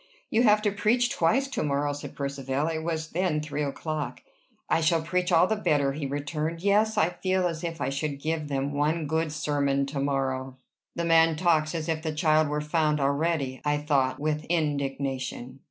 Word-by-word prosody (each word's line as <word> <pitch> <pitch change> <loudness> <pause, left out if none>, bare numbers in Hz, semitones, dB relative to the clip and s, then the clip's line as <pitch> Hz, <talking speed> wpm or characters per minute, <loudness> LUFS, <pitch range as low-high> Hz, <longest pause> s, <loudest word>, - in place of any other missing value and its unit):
"You 225 - +3
have 210 -3 +4
to 205 - +2
preach 225 +5 +2
twice 240 +12 +2
to - - -2
morrow," 145 0 0
said 145 - -8
Percivale: 140 +1 -2
it 160 - -5
was 160 -1 -3
then 175 -3 0
three 150 -1 -4
o'clock. 150 +1 -3 0.5
"I 165 - +2
shall 160 0 +2
preach 180 +3 -1
all 170 0 +6
the 220 - 0
better," 145 -9 +1
he 145 -1 -3
returned. 150 +4 -3
"Yes: 210 +2 +3
I 165 - +4
feel 185 +1 0
as 165 -1 -5
if 165 -1 -4
I 130 -1 -1
should 140 +1 -3
give 155 0 -2
them 140 0 -2
one 155 +3 0
good 160 +1 -1
sermon 140 -2 0
to 140 0 -4
morrow." 135 -1 -1 0.4
"The 170 - -1
man 165 -1 +5
talks 160 -1 +2
as 160 -1 -3
if 160 -1 -1
the 160 -1 -3
child 155 -1 +3
were 150 +1 -1
found 150 0 +1
already!" 140 -1 0
I 145 0 +1
thought, 140 -3 +1
with 150 +1 -1
indignation. 135 -5 -2
155 Hz, 190 wpm, -27 LUFS, 140-165 Hz, 0.5 s, all